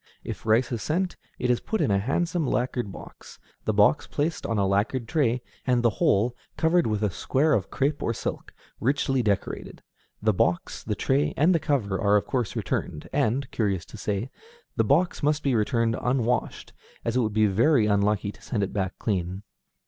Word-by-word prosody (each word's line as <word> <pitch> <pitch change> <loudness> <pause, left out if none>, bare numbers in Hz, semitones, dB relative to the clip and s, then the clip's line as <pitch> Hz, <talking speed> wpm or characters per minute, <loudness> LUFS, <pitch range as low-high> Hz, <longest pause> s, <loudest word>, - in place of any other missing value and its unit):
If - - -7
rice 115 +3 +3
is 115 -3 -2
sent, 180 +4 -1 0.2
it 125 0 +1
is 120 - +2
put 220 - -2
in 145 - +2
a 100 - +3
handsome 165 - 0
lacquered 125 -4 -1
box, - - -12 0.3
the - - +2
box 105 +8 +3
placed 155 +3 -2
on 115 - -1
a 100 - +2
lacquered 105 +5 0
tray, 125 -5 +1 0.2
and 125 -1 +2
the 120 - +4
whole 115 +5 +3 0.2
covered 170 -1 +3
with 105 -1 -1
a 105 - +1
square 145 - +1
of 95 -9 0
crêpe 145 +2 0
or - - 0
silk, 115 - -4 0.3
richly 135 +1 +1
decorated. 105 -4 -2 0.4
The 110 0 +2
box, 85 -1 0
the - - -2
tray, 75 +2 +1
and 160 +6 +4
the 165 - +3
cover 110 -10 0
are 100 0 +4
of 105 - +2
course 125 -5 -2
returned, 75 - -3
and, 135 -1 +1
curious 100 -6 -1
to - - -12
say, 105 +4 -3 0.4
the 115 - +3
box 155 +10 +2
must 150 +1 +1
be 135 - +2
returned 115 0 +1
unwashed, 125 -1 -1 0.3
as 115 - -1
it - - +3
would 110 -3 0
be 110 0 +4
very 115 +5 +3
unlucky 100 -1 +1
to 105 - -19
send 110 -2 -2
it 100 - -3
back 95 -2 -2
clean. 95 -2 -2
115 Hz, 195 wpm, -26 LUFS, 105-135 Hz, 0.4 s, the